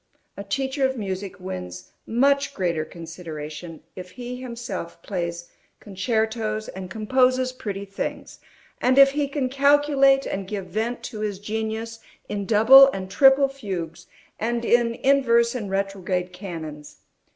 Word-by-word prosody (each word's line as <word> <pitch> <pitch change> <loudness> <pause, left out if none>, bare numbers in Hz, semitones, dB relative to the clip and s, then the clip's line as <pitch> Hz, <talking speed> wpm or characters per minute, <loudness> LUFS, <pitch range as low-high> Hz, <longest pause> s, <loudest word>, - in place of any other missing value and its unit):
A 200 - -7
teacher 265 +6 -2
of 265 0 +1
music 195 -2 -5
wins 90 - -7 0.2
much 280 +4 +2
greater 170 -4 0
consideration, 160 -1 -8
if 180 -1 -8
he 245 +4 -7
himself 235 -8 -6
plays 170 -3 -4 0.3
concertos 220 +1 -2
and 185 -1 -7
composes 255 +4 +2
pretty 205 -6 -6
things, 195 0 -6 0.4
and 255 +2 +3
if 275 0 +8
he 290 0 -1
can 275 -2 -2
calculate 275 0 +4
and 195 -1 -4
give 195 -2 -4
vent 225 +6 -3
to 225 -3 -6
his 210 -2 -2
genius 220 +2 -4 0.3
in 200 -2 -4
double 245 +6 +8
and 190 -6 -6
triple 270 +5 +6
fugues, 190 -12 -6 0.3
and 235 +1 -1
in 235 -1 +3
inverse 235 -4 +3
and 220 -6 -4
retrograde 190 -2 -2
canons. 160 -6 -8
215 Hz, 135 wpm, -24 LUFS, 185-255 Hz, 0.4 s, if